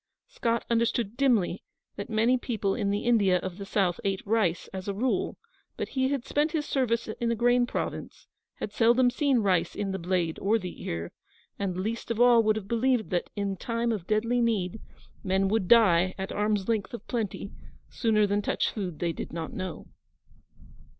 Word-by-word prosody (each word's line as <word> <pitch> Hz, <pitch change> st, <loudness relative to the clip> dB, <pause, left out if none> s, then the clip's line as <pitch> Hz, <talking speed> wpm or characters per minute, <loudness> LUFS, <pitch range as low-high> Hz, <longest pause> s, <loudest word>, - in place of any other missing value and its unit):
Scott 230 Hz, 0 st, -1 dB
understood 235 Hz, -2 st, 0 dB
dimly 240 Hz, -9 st, +2 dB, 0.3 s
that 200 Hz, -, -6 dB
many 225 Hz, +3 st, +3 dB
people 220 Hz, -6 st, -1 dB
in 205 Hz, -3 st, -1 dB
the 205 Hz, +2 st, -1 dB
India 205 Hz, -6 st, +4 dB
of 185 Hz, +1 st, -6 dB
the 200 Hz, -, -6 dB
South 190 Hz, -4 st, +1 dB
ate 195 Hz, -1 st, -2 dB
rice, 195 Hz, -5 st, +1 dB
as 190 Hz, 0 st, -6 dB
a 200 Hz, -, -2 dB
rule, 245 Hz, +5 st, -1 dB, 0.4 s
but -, -, -3 dB
he 260 Hz, -1 st, +1 dB
had 275 Hz, -3 st, -2 dB
spent 295 Hz, +3 st, 0 dB
his 305 Hz, -2 st, 0 dB
service 235 Hz, -5 st, 0 dB
in 230 Hz, +2 st, -2 dB
a -, -, +1 dB
grain 245 Hz, +1 st, +3 dB
Province, -, -, -5 dB, 0.3 s
had 205 Hz, -, -6 dB
seldom 240 Hz, +2 st, +4 dB
seen 275 Hz, -3 st, +2 dB
rice 185 Hz, -4 st, +1 dB
in 200 Hz, -1 st, -2 dB
the 190 Hz, -, -3 dB
blade 175 Hz, -2 st, -1 dB
or 210 Hz, +3 st, +2 dB
the 185 Hz, -4 st, -7 dB
ear, 85 Hz, 0 st, -4 dB, 0.5 s
and 190 Hz, -3 st, -2 dB
least 220 Hz, +6 st, -3 dB
of 230 Hz, -1 st, -2 dB
all 245 Hz, -1 st, +7 dB
would 215 Hz, -1 st, +2 dB
have 210 Hz, -3 st, -5 dB
believed 235 Hz, 0 st, +1 dB
that, 175 Hz, -1 st, -1 dB
in 200 Hz, -1 st, -2 dB
time 230 Hz, +4 st, -1 dB
of 200 Hz, -6 st, -4 dB
deadly 230 Hz, +3 st, +1 dB
need, 220 Hz, -3 st, 0 dB, 0.4 s
men 190 Hz, 0 st, +1 dB
would 210 Hz, -3 st, +1 dB
die 185 Hz, -6 st, +5 dB
at 190 Hz, 0 st, -4 dB
arm's 210 Hz, -2 st, 0 dB
length 225 Hz, 0 st, -1 dB
of 230 Hz, -, -11 dB
plenty, 215 Hz, -4 st, -3 dB, 0.4 s
sooner 215 Hz, -3 st, +2 dB
than 205 Hz, 0 st, 0 dB
touch -, -, 0 dB
food 185 Hz, -7 st, -4 dB
they 170 Hz, 0 st, -1 dB
did -, -, -6 dB
not 165 Hz, -1 st, -5 dB
know. 185 Hz, -2 st, -5 dB
215 Hz, 190 wpm, -28 LUFS, 190-235 Hz, 0.5 s, all